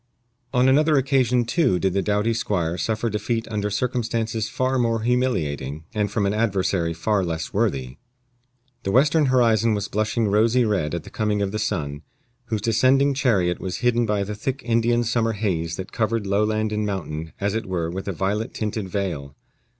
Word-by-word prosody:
On 125 +1 +3
another 150 +3 +4
occasion, 130 -3 +2
too, 125 - +2
did 95 0 0
the 100 - +1
doughty 105 +3 +1
squire 90 -7 -1
suffer 110 +4 -1
defeat 115 +2 -2
under 105 -1 -1
circumstances 115 0 -1
far 130 0 0
more 115 -2 +1
humiliating, 80 - -1
and 105 -2 0
from 105 -2 0
an 100 - +1
adversary 95 -6 0
far 95 +4 0
less 80 -2 -4
worthy. 70 - -1 0.8
The - - -3
western 145 +6 +4
horizon 115 -3 +3
was 100 -1 -2
blushing 110 +2 0
rosy 115 +4 +3
red 95 -7 0
at 85 - -4
the - - -12
coming 105 -2 0
of 95 - -2
the 110 - -3
sun, 75 -7 -2 0.4
whose 110 -3 -2
descending 130 +6 +3
chariot 100 -10 +1
was 95 - -4
hidden 120 -1 +3
by 105 -1 +1
the 105 +2 -4
thick 130 +5 -4
Indian 120 +1 +2
summer 115 -1 +1
haze 85 -6 -1
that 95 +2 -7
covered 110 -1 -1
lowland 105 +2 +1
and 105 0 -1
mountain 80 -6 -4
as 100 0 0
it 110 -2 -3
were 85 -3 -2
with 95 +3 -5
a - - 0
violet 100 +5 -2
tinted 105 -2 -3
veil. 85 -8 -3
105 Hz, 180 wpm, -23 LUFS, 95-115 Hz, 0.8 s, another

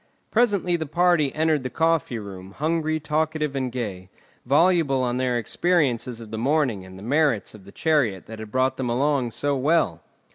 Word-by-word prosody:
Presently 205 -7 +2
the 160 -2 -4
party 170 -2 +2
entered 155 -2 +2
the 130 - -4
coffee 165 -6 +1
room, 95 -2 -9
hungry, 155 +2 -1
talkative, 155 -1 -1
and 130 -2 -2
gay, 100 -7 -5 0.4
voluble 145 -2 +3
on 125 0 -1
their 125 -1 0
experiences 125 - 0
of 110 -2 -10
the 110 - -4
morning 130 -6 +1
and 95 0 -12
the 95 - -11
merits 140 -2 +1
of 105 -3 -14
the 100 - -13
chariot 140 - 0
that 110 0 -9
had 110 -1 -8
brought 130 +1 +1
them 130 -2 -2
along 135 0 +1
so 145 +5 -1
well. 135 - +1
135 Hz, 180 wpm, -24 LUFS, 115-155 Hz, 0.4 s, voluble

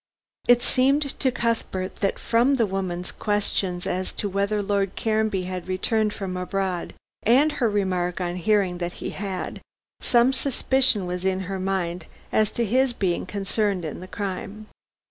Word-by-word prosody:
It 245 0 +6
seemed 275 +3 +3 0.2
to 260 - +2
Cuthbert 225 -6 -2
that, 195 - 0
from 240 +4 +3
the 235 -4 +3
woman's 185 -2 -3
question 200 -3 0
as 185 +1 -1
to 205 - -2
whether 200 +2 0
Lord 200 -1 0
Caranby 215 -4 +1
had 185 0 -5
returned 210 +3 +1
from 190 -3 -4
abroad, 180 0 -2 0.3
and 270 +7 +4
her 240 -6 +1
remark 185 -4 0
on 175 -1 -2
hearing 185 -1 +2
that 175 0 -3
he - - -5
had, 195 -2 -4 0.4
some 240 +2 +4
suspicion 265 -5 +2
was 180 0 -3
in 190 0 +1
her 190 +1 -4
mind 180 -3 -2 0.2
as 215 -1 +3
to 235 - 0
his 255 +4 +2
being 185 -6 -1
concerned 200 -2 0
in 155 - -5
the 185 - -8
crime. 200 +2 -5
195 Hz, 160 wpm, -25 LUFS, 185-225 Hz, 0.4 s, It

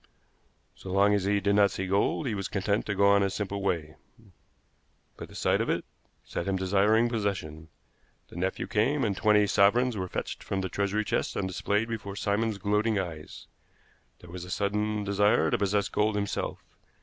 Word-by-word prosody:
So 95 - -9
long 100 +2 +4
as 100 -2 +1
he 100 0 +2
did 100 0 +1
not 100 0 +5
see 95 0 -4
gold 100 +10 +1
he 120 - -1
was 100 -2 -3
content 100 +2 -1
to 100 - -1
go 100 +1 +3
on 100 0 +5
his 100 0 0
simple 100 -1 -3
way, 80 -5 -2 1.2
but - - -9
the - - -14
sight - - +1
of - - -2
it - - -1 0.4
set 85 - -5
him 95 - 0
desiring 100 +5 +3
possession. 95 -9 -3 0.6
The - - -14
nephew 95 +2 -2
came, 125 +6 +1
and 100 -3 0
twenty 105 0 +4
sovereigns 110 +5 +3
were 95 -2 -3
fetched - - -5
from 95 -1 -3
the 95 - -3
treasury 100 +3 -1
chest - - -1
and 95 - -1
displayed 105 +4 -1
before 110 -4 -5
Simon's 105 +1 -1
gloating 105 +2 +1
eyes. 80 -5 -6 0.8
There 90 - -13
was 90 0 -7
a 90 - -9
sudden 105 +2 -1
desire 100 -5 +2
to - - +2
possess 100 0 +1
gold 105 0 0
himself. 100 0 -3
100 Hz, 185 wpm, -28 LUFS, 95-105 Hz, 1.2 s, not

